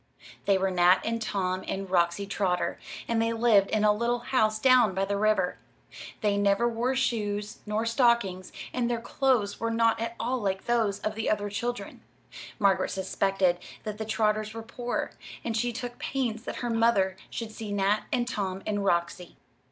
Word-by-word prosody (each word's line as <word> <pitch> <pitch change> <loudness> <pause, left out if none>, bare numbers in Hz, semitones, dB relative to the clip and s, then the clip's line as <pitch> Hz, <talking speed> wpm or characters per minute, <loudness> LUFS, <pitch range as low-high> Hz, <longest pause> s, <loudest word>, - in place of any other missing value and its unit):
They 200 -1 +4
were 190 0 0
Nat 180 +1 +5
and 230 0 -1
Tom 185 -3 -1
and 195 0 -3
Roxy 175 +1 +1
Trotter, 190 -3 -1 0.3
and 230 -1 +1
they 230 0 +1
lived 225 -4 +4
in 215 -1 +1
a 210 0 +5
little 235 +3 0
house 235 -3 +1
down 245 -5 +5
by 195 +1 +1
the 200 +1 -1
river. 205 -3 +1 0.6
They 205 -1 +2
never 200 +3 +3
wore 240 +3 0
shoes 210 -4 -1
nor 215 +2 0
stockings, 230 -6 +2 0.2
and 245 -1 0
their 235 -1 0
clothes 235 -4 0
were 230 - -1
not 230 0 +2
at 230 0 -3
all 250 +3 -1
like 190 -1 -2
those 225 -4 +1
of 215 - -2
the 220 0 -2
other 205 -1 0
children. 240 +4 -4 0.6
Margaret 195 -2 +2
suspected 190 -1 +1 0.2
that 215 -1 -5
the 220 - -3
Trotters 215 0 0
were 225 - -5
poor, 240 +1 -3 0.3
and 230 -1 -2
she 240 +2 0
took 245 +1 -6
pains 240 -4 -2
that - - -4
her 240 - -1
mother 225 -5 +3
should 225 -2 -5
see 215 -1 -7
Nat 205 +1 +1
and 245 -1 0
Tom 195 -5 -3
and 205 -1 -1
Roxy. 175 -1 -1
215 Hz, 180 wpm, -28 LUFS, 195-230 Hz, 0.6 s, Nat